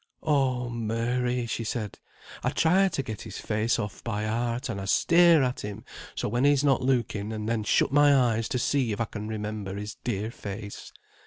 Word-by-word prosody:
"Oh 130 Hz, -5 st, +1 dB
Mary!" 120 Hz, +2 st, -1 dB
she 115 Hz, 0 st, -3 dB
said, 110 Hz, -2 st, -4 dB, 0.4 s
"I -, -, +2 dB
try 185 Hz, +4 st, +3 dB
to 145 Hz, -7 st, -2 dB
get 110 Hz, -5 st, -6 dB
his 110 Hz, -3 st, -8 dB
face 110 Hz, +2 st, 0 dB
off 105 Hz, -3 st, -5 dB
by 105 Hz, -2 st, -2 dB
heart, 120 Hz, +3 st, -1 dB
and 105 Hz, -5 st, -4 dB
I -, -, -5 dB
stare 170 Hz, -, +5 dB
at 125 Hz, 0 st, -1 dB
him 105 Hz, -1 st, -7 dB, 0.3 s
so -, -, -2 dB
when 120 Hz, +4 st, 0 dB
he's 145 Hz, -1 st, +4 dB
not 140 Hz, -2 st, +3 dB
looking, 120 Hz, -5 st, 0 dB
and 110 Hz, -1 st, -4 dB
then 115 Hz, -1 st, 0 dB
shut 105 Hz, -, +2 dB
my 145 Hz, 0 st, +6 dB
eyes 115 Hz, -4 st, +2 dB
to 125 Hz, -, 0 dB
see 125 Hz, -1 st, +1 dB
if 105 Hz, -, -5 dB
I 115 Hz, -, +1 dB
can 105 Hz, 0 st, -7 dB
remember 105 Hz, -2 st, -4 dB
his 105 Hz, +1 st, -6 dB
dear 110 Hz, -2 st, -2 dB
face. 100 Hz, -1 st, -8 dB
115 Hz, 195 wpm, -27 LUFS, 105-130 Hz, 0.4 s, my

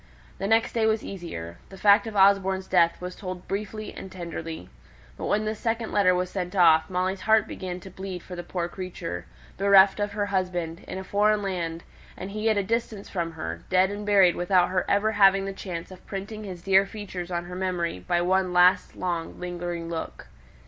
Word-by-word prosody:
The 195 Hz, -, -2 dB
next 225 Hz, +3 st, +2 dB
day 225 Hz, -2 st, +2 dB
was 220 Hz, 0 st, +1 dB
easier; 85 Hz, -, -7 dB
the 195 Hz, -, -11 dB
fact 205 Hz, +2 st, +5 dB
of 220 Hz, -, -6 dB
Osborne's 195 Hz, -1 st, +4 dB
death 170 Hz, -3 st, +3 dB
was 180 Hz, 0 st, -6 dB
told 185 Hz, -3 st, -7 dB
briefly 210 Hz, +1 st, -4 dB
and 190 Hz, -, -9 dB
tenderly. 165 Hz, -, -6 dB, 0.5 s
But -, -, -5 dB
when 215 Hz, +1 st, +1 dB
this 215 Hz, 0 st, -3 dB
second 225 Hz, -1 st, -2 dB
letter 185 Hz, -3 st, +4 dB
was 180 Hz, 0 st, -1 dB
sent 180 Hz, 0 st, -4 dB
off, 165 Hz, -3 st, +5 dB
Molly's 185 Hz, +1 st, -1 dB
heart 220 Hz, -1 st, +3 dB
began 180 Hz, -1 st, -5 dB
to 190 Hz, -, -11 dB
bleed 190 Hz, -1 st, -7 dB
for 180 Hz, -, -8 dB
the 175 Hz, -, -5 dB
poor 175 Hz, 0 st, -3 dB
creature, 175 Hz, -, -6 dB, 0.3 s
bereft 195 Hz, 0 st, +6 dB
of 205 Hz, 0 st, -1 dB
her 205 Hz, 0 st, -1 dB
husband, 180 Hz, -4 st, -2 dB
in -, -, -5 dB
a 190 Hz, -, -5 dB
foreign 210 Hz, +2 st, +2 dB
land, 170 Hz, -4 st, -3 dB, 0.3 s
and 190 Hz, +2 st, -6 dB
he 215 Hz, +2 st, 0 dB
at 215 Hz, -, +2 dB
a 200 Hz, -, +2 dB
distance 220 Hz, -1 st, -2 dB
from 170 Hz, -3 st, -3 dB
her, 85 Hz, -, -5 dB
dead 185 Hz, +1 st, +3 dB
and 205 Hz, +1 st, -5 dB
buried 195 Hz, -4 st, +5 dB
without 175 Hz, 0 st, +3 dB
her 185 Hz, 0 st, 0 dB
ever 205 Hz, +2 st, +2 dB
having 195 Hz, -2 st, +5 dB
had 195 Hz, -, -4 dB
the -, -, -15 dB
chance 175 Hz, -2 st, -6 dB
of 185 Hz, -, -14 dB
printing 210 Hz, +2 st, -6 dB
his 180 Hz, -3 st, -8 dB
dear 195 Hz, 0 st, +4 dB
features 190 Hz, -4 st, -7 dB
on 175 Hz, -1 st, -3 dB
her 180 Hz, +1 st, -8 dB
memory 180 Hz, -, -2 dB
by 175 Hz, -, 0 dB
one 185 Hz, 0 st, +2 dB
last 180 Hz, +1 st, +4 dB
long 170 Hz, -2 st, -3 dB
lingering 175 Hz, -1 st, -4 dB
look. 165 Hz, -1 st, -5 dB
185 Hz, 205 wpm, -26 LUFS, 175-200 Hz, 0.5 s, bereft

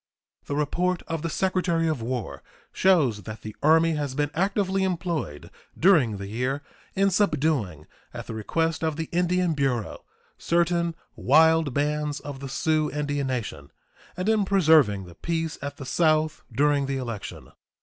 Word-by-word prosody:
The 140 Hz, -, -3 dB
report 175 Hz, +5 st, 0 dB
of 165 Hz, -2 st, -4 dB
the 165 Hz, -, -2 dB
Secretary 180 Hz, -2 st, 0 dB
of 155 Hz, -6 st, -1 dB
War 115 Hz, -, -4 dB, 0.3 s
shows 150 Hz, -, +3 dB
that 110 Hz, +2 st, -9 dB
the 110 Hz, -1 st, -7 dB
Army 160 Hz, +2 st, +4 dB
has 145 Hz, -3 st, -3 dB
been 145 Hz, 0 st, 0 dB
actively 195 Hz, +1 st, 0 dB
employed 170 Hz, -, -3 dB, 0.3 s
during 155 Hz, -, +4 dB
the 100 Hz, -, -6 dB
year 125 Hz, +7 st, -2 dB, 0.3 s
in 195 Hz, 0 st, +3 dB
subduing, 145 Hz, -, 0 dB, 0.3 s
at -, -, -7 dB
the -, -, -7 dB
request 160 Hz, +10 st, -1 dB
of 160 Hz, -2 st, 0 dB
the 160 Hz, 0 st, -4 dB
Indian 180 Hz, 0 st, +1 dB
Bureau, 135 Hz, -7 st, -2 dB, 0.4 s
certain 170 Hz, 0 st, +1 dB, 0.2 s
wild 160 Hz, 0 st, +4 dB
bands 150 Hz, 0 st, -1 dB
of 140 Hz, -2 st, -8 dB
the 135 Hz, 0 st, -7 dB
Sioux 155 Hz, +2 st, +1 dB
Indian 145 Hz, -1 st, -2 dB
Nation 110 Hz, -, -4 dB, 0.5 s
and 185 Hz, +2 st, -2 dB
in 220 Hz, -2 st, +3 dB
preserving 160 Hz, -, +4 dB
the 85 Hz, -, -12 dB
peace 165 Hz, -, -3 dB
at 140 Hz, +1 st, -6 dB
the 135 Hz, -, -8 dB
South 155 Hz, +3 st, +1 dB
during 140 Hz, +3 st, +2 dB
the 135 Hz, 0 st, -2 dB
election. 115 Hz, -5 st, -6 dB
150 Hz, 155 wpm, -25 LUFS, 130-170 Hz, 0.5 s, Army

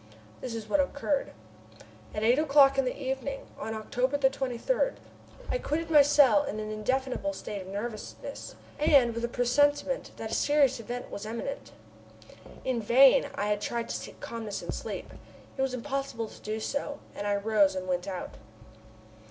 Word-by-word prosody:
This 245 Hz, -3 st, -4 dB
is 220 Hz, -2 st, -6 dB
what 295 Hz, -, +2 dB
occurred: 285 Hz, 0 st, 0 dB, 0.8 s
At 210 Hz, -, -2 dB
eight 240 Hz, +5 st, +4 dB
o'clock 275 Hz, -2 st, +5 dB
in 270 Hz, -, +2 dB
the 250 Hz, -, -3 dB
evening 270 Hz, 0 st, -3 dB
on 220 Hz, +1 st, -4 dB
October 250 Hz, +5 st, -1 dB
23, 270 Hz, -, +1 dB, 0.6 s
I -, -, +1 dB
quitted 325 Hz, -2 st, -2 dB
my 300 Hz, -2 st, +9 dB
cell 280 Hz, -7 st, +5 dB
in 215 Hz, -, -4 dB
an 215 Hz, 0 st, -4 dB
indefinable 260 Hz, +6 st, -1 dB
state 205 Hz, -7 st, -6 dB
of 185 Hz, -, -10 dB
nervousness, 210 Hz, +3 st, -6 dB, 0.2 s
and 280 Hz, -6 st, +5 dB
with 230 Hz, +1 st, -4 dB
a -, -, +1 dB
presentiment 290 Hz, -, +1 dB
that -, -, -5 dB
a -, -, -2 dB
serious 285 Hz, -4 st, +3 dB
event 245 Hz, +2 st, -6 dB
was 205 Hz, +1 st, -6 dB
imminent. 235 Hz, +5 st, -5 dB, 0.9 s
In 255 Hz, -3 st, 0 dB
vain 255 Hz, +5 st, +6 dB
I 205 Hz, -, -1 dB
had 210 Hz, 0 st, 0 dB
tried 235 Hz, +1 st, -2 dB
to -, -, -2 dB
seek -, -, -7 dB
calmness 220 Hz, -3 st, -5 dB
in -, -, -4 dB
sleep. -, -, -6 dB, 0.4 s
It 265 Hz, -, -3 dB
was 265 Hz, -1 st, 0 dB
impossible 265 Hz, -3 st, -3 dB
to -, -, -14 dB
do 215 Hz, +1 st, -3 dB
so, 285 Hz, +5 st, -3 dB, 0.2 s
and 205 Hz, -, -4 dB
I 205 Hz, -, +2 dB
rose 200 Hz, -2 st, +3 dB
and 185 Hz, 0 st, -4 dB
went 180 Hz, +1 st, -1 dB
out. 185 Hz, -2 st, -5 dB
250 Hz, 170 wpm, -29 LUFS, 215-280 Hz, 0.9 s, my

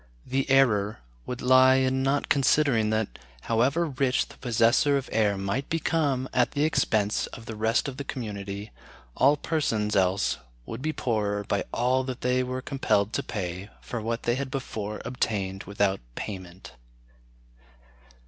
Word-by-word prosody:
The 135 Hz, +2 st, -1 dB
error 110 Hz, -7 st, +3 dB, 0.3 s
would 125 Hz, -, -5 dB
lie 130 Hz, +1 st, +6 dB
in 130 Hz, 0 st, +2 dB
not 135 Hz, +1 st, +1 dB
considering 135 Hz, -5 st, +3 dB
that, 110 Hz, -1 st, -1 dB, 0.2 s
however 130 Hz, -, +2 dB
rich 135 Hz, -3 st, 0 dB
the -, -, -14 dB
possessor 120 Hz, +4 st, +3 dB
of 135 Hz, -, -4 dB
air 105 Hz, -2 st, +2 dB
might 100 Hz, +8 st, -2 dB
become 150 Hz, -5 st, 0 dB
at 125 Hz, -1 st, +2 dB
the 145 Hz, -, +1 dB
expense 110 Hz, -9 st, +1 dB
of 115 Hz, -, -11 dB
the 115 Hz, -, -6 dB
rest 110 Hz, +5 st, +1 dB
of 135 Hz, -2 st, -6 dB
the 140 Hz, -, -4 dB
community, 100 Hz, -5 st, -5 dB, 0.4 s
all 140 Hz, +3 st, +4 dB
persons 115 Hz, -10 st, -1 dB
else 95 Hz, -5 st, +2 dB, 0.3 s
would -, -, -6 dB
be 155 Hz, +2 st, 0 dB
poorer 105 Hz, -7 st, -1 dB
by 100 Hz, 0 st, -1 dB
all 125 Hz, +2 st, +1 dB
that 130 Hz, -1 st, -5 dB
they 125 Hz, +1 st, +2 dB
were 130 Hz, 0 st, -3 dB
compelled 110 Hz, -7 st, 0 dB
to -, -, 0 dB
pay 95 Hz, -2 st, -5 dB
for 115 Hz, -, -5 dB
what 115 Hz, +1 st, -3 dB
they 120 Hz, -, +2 dB
had 135 Hz, +2 st, -3 dB
before 110 Hz, -6 st, -5 dB
obtained 100 Hz, -6 st, -2 dB
without 100 Hz, -1 st, 0 dB, 0.2 s
payment. 95 Hz, -4 st, -7 dB
120 Hz, 155 wpm, -27 LUFS, 105-135 Hz, 0.4 s, lie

